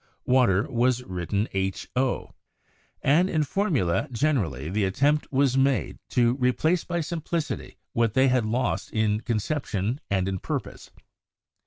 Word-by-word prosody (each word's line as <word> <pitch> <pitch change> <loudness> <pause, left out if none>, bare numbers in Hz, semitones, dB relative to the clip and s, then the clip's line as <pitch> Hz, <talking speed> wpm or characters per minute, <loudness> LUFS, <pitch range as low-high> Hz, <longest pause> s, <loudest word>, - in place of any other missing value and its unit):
Water 120 -5 +3
was 125 0 +1
written 95 +1 -2 0.5
HO, 130 0 -1 0.7
and 170 +7 +4
in 155 -4 +1
formulae 145 - 0
generally 110 - 0
the 100 +5 0
attempt 140 +11 +1
was 135 -1 +2
made 135 0 +1
to 120 -1 +3
218 135 - -8
CHEMISTRY 125 0 +3
replace 160 +7 +1
by 175 -1 -2
simplicity 165 0 -4 0.2
what 115 -2 +1
they 130 +1 +5
had 125 -2 +2
lost 115 +4 -1
in 110 -1 +1
conception 115 -1 -2
and 95 -2 +1
in 95 -1 -2
purpose. - - -5
125 Hz, 140 wpm, -26 LUFS, 105-145 Hz, 0.7 s, they